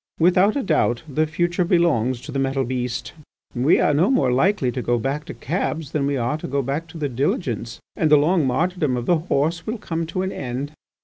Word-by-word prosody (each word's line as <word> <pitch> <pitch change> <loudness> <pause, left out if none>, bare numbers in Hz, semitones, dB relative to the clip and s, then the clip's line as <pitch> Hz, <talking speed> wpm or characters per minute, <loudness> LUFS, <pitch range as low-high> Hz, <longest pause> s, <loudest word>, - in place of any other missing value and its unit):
Without 185 +5 +4
a 280 - 0
doubt 150 -8 +1
the 155 +2 0
future 175 +3 0
belongs 150 -9 +2
to - - -8
the 135 - -2
metal 135 0 0
beast. 125 -1 -3 0.4
We 130 +5 +3
are 150 - +3
no 160 +7 +3
more 135 - +2
likely 135 0 +2
to 125 - -3
go 120 0 +1
back 140 +5 -2
to - - -8
cabs 160 -1 -3
than 140 -2 0
we 140 -1 0
are 125 +5 -1
to - - -6
go 140 +1 -1
back 140 +6 -3
to 165 +1 -11
the 150 -2 -1
diligence. 120 - -2 0.2
And 160 - +1
the 150 - +7
long 155 0 +2
martyrdom 155 -1 0
of 120 - -3
the 175 +2 +3
horse 165 +1 -1
will 225 +2 -2
come 165 -5 -3
to 185 +3 -2
an 190 - -2
end. 130 +3 -4
150 Hz, 225 wpm, -22 LUFS, 130-170 Hz, 0.4 s, the